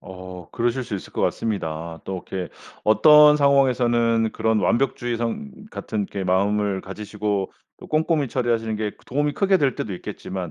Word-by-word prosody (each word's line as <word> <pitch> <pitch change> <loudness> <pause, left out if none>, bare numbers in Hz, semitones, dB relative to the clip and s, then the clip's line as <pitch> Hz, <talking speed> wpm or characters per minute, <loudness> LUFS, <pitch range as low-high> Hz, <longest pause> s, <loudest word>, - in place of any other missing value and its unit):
어 90 -2 -10
그러실 120 +2 -1
수 110 - -5
있을 - - -10
것 - - -3
같습니다. 80 -6 -2
또 95 -2 -5
이렇게 95 -2 -5 0.3
어떤 150 +6 +7
상황에서는 120 -5 +3
그런 110 0 +1
완벽주의성 120 - -1
같은 110 - -4
이렇게 100 -1 -5
마음을 100 +1 +1
가지시고 105 0 -3 0.3
또 - - -11
꼼꼼히 155 -3 +1
처리하시는 115 -3 -1
게 105 -1 -2
그 - - -25
도움이 145 +3 0
크게 195 -1 +3
될 135 -6 +1
때도 100 - -4
있겠지만 90 0 -6
110 Hz, 370 characters per minute, -23 LUFS, 95-130 Hz, 0.3 s, 어떤